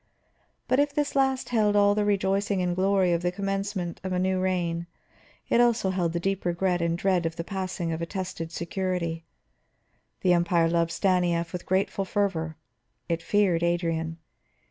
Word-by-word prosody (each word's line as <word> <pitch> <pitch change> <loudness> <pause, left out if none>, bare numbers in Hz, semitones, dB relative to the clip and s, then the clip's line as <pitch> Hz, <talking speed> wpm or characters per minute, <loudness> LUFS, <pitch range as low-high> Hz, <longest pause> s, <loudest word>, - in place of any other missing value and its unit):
But 255 - +2
if 285 0 +1
this 295 -1 0
last 265 -1 +1
held 215 -4 +2
all 205 0 +5
the 210 0 +1
rejoicing 200 0 +1
and 180 -1 0
glory 190 -1 +2
of 170 - 0
the 175 0 0
commencement 195 -2 -3
of 190 - -3
a 180 - 0
new 185 +1 +1
reign, 175 -2 -1 0.6
it - - +3
held 240 -1 +5
also 185 -5 0
the 170 +1 -2
deep 195 +2 -1
regret 175 0 0
and 170 0 0
dread 180 -2 +1
of 165 - -6
the 165 - -4
passing 185 -3 -3
of 160 0 -3
a 170 - -2
tested 180 -4 -5
security. 170 -1 -3 1.0
The 180 -2 +4
Empire 170 -1 +3
loved 170 0 +1
Stanief 175 -2 +1
with 180 - -6
grateful 190 +1 +1
fervor, 175 -5 -1 0.5
it 165 0 -1
feared 190 -3 +2
Adrian. 165 -1 -1
180 Hz, 170 wpm, -27 LUFS, 170-195 Hz, 1.0 s, all